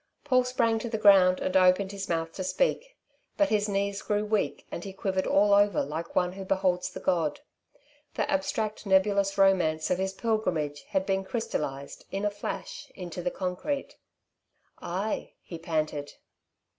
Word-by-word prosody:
Paul 255 -3 +3
sprang 235 -3 +1
to 235 - -4
the 220 - -2
ground 190 -3 +6
and 185 - -2
opened 185 +1 +4
his 195 -1 -6
mouth 165 -1 -1
to 190 - -4
speak. - - -1 0.4
But 300 -1 +3
his 210 -1 +1
knees 200 0 -1
grew 210 0 -1
weak 210 -1 -1
and 170 - -5
he 195 - -7
quivered 190 -1 -1
all 205 +1 +4
over 205 -3 +4
like 160 +3 -5
one 180 0 +2
who 195 0 -7
beholds 185 -2 0
the - - -8
god. 165 - 0 0.7
The - - 0
abstract 285 -8 -2
nebulous 195 0 +3
romance 180 -6 +3
of 180 - +1
his 190 0 -1
pilgrimage 175 -10 -1
had 190 -2 0
been 195 0 0
crystallized, 150 - -4
in 195 +1 -3
a 205 - +1
flash, 480 - -6
into 180 -2 -6
the 180 - 0
concrete. 195 +12 -4 0.8
"Ay," 195 +5 -3
he 170 - -9
panted. 155 -3 -2
195 Hz, 165 wpm, -28 LUFS, 180-210 Hz, 0.8 s, ground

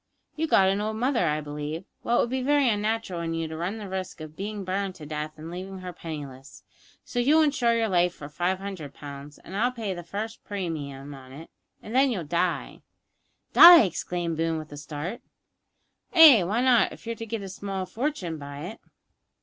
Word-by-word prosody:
You've 320 +1 -2
got 190 -8 +5
an 195 +2 +1
old 215 +1 -2
mother, 240 -5 +1
I 150 0 0
believe; 150 +2 -5 0.2
well, 240 - +1
it - - +4
would 235 - -1
be 260 0 -1
very 285 +1 +3
unnatural 210 -4 -1
in 165 0 -2
you 165 0 -2
to 160 - -7
run 175 +7 -3
the 210 -2 -7
risk 185 -2 -5
of 155 0 -9
being 205 +2 -5
burned 190 0 -2
to 155 - -10
death, 155 +1 -5
an' 160 +2 -8
leaving 190 +2 -6
her 180 -1 -7
penniless; 145 -5 -9 0.4
so 245 - -3
you'll 300 +6 +5
insure 255 -6 +2
your 225 -1 +1
life 180 -2 +2
for 145 - -9
five 175 +5 -1
hundred 190 -7 -7
pounds, 145 0 -9
and 190 - -11
I'll 240 +5 +2
pay 225 -6 -4
the 175 - -6
first 210 +6 -6
premium 145 -8 -5
on 130 -1 -12
it, 155 +5 -11 0.3
and 220 - -8
then 265 +2 +4
you'll 200 -9 -2
die 170 +3 -2 0.4
" - - -46
"Die!" 340 -4 +11
exclaimed 175 -3 -3
Boone, 165 0 0
with 155 -1 -8
a 145 - -8
start. 150 +8 -6 0.9
"Ay; 300 - +9
why 215 +7 0
not, 245 -5 +4
if - - -12
you're 230 - -2
to 225 - -7
get 225 -2 -4
a - - -6
small 190 0 -4
fortune 185 - -3
by 140 0 -8
it." 195 +8 -7
185 Hz, 210 wpm, -26 LUFS, 155-225 Hz, 0.9 s, Die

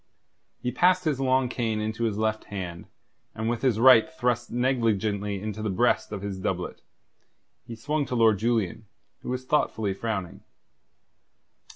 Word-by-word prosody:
He 125 - -2
passed 180 +4 +3
his 150 -5 0
long 130 -1 +2
cane 115 -3 -2
into 110 +2 -2
his 105 -3 -1
left 110 0 -1
hand, 90 -4 -6 0.5
and 110 +1 -3
with 115 -1 -1
his 125 -5 +2
right 130 +4 +7
thrust 125 -7 -1
negligently 110 -5 0
into 105 +1 -5
the 110 - -1
breast 110 +5 +1
of 100 -2 -5
his 100 -2 -4
doublet, - - -3 0.9
he 115 - -7
swung 145 +5 -2
to 125 - -3
Lord 110 -4 +4
Julian, 110 -2 -1 0.3
who - - -7
was 125 +1 -3
thoughtfully 110 -8 0
frowning. 95 -3 -4
115 Hz, 155 wpm, -26 LUFS, 105-125 Hz, 0.9 s, right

